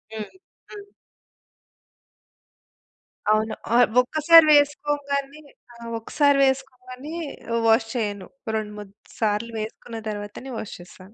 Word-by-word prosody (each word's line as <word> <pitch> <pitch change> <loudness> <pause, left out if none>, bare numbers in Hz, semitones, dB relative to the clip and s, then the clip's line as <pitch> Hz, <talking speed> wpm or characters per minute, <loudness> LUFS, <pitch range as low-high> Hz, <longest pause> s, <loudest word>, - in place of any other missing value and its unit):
హ్మ్. 215 -1 -6 0.4
హ్మ్. 410 -1 -10 2.4
అవును. 215 +1 +2 0.2
ఆహ్, 245 +1 +6
ఒక్కసారి 310 +5 +6
వేసుకోంగానే 290 0 0 0.3
ఆ! - - -17 0.2
ఒక్కసారి 285 +5 +2
వేసుకోంగానే 265 +1 -4 0.4
ఆహ్, 230 - +1
వాష్ 225 0 +4
చెయ్యను. 205 -5 -3 0.3
రెండు, 215 -1 -3
మూడు 205 -2 -10 0.3
సార్లు 220 +1 0
వేసుకున్న 225 +2 -7
తర్వాతనే 210 +5 -7
వాష్ 220 - -6
చేస్తాను. 185 +3 -15
245 Hz, 100 wpm, -23 LUFS, 215-280 Hz, 2.4 s, ఆహ్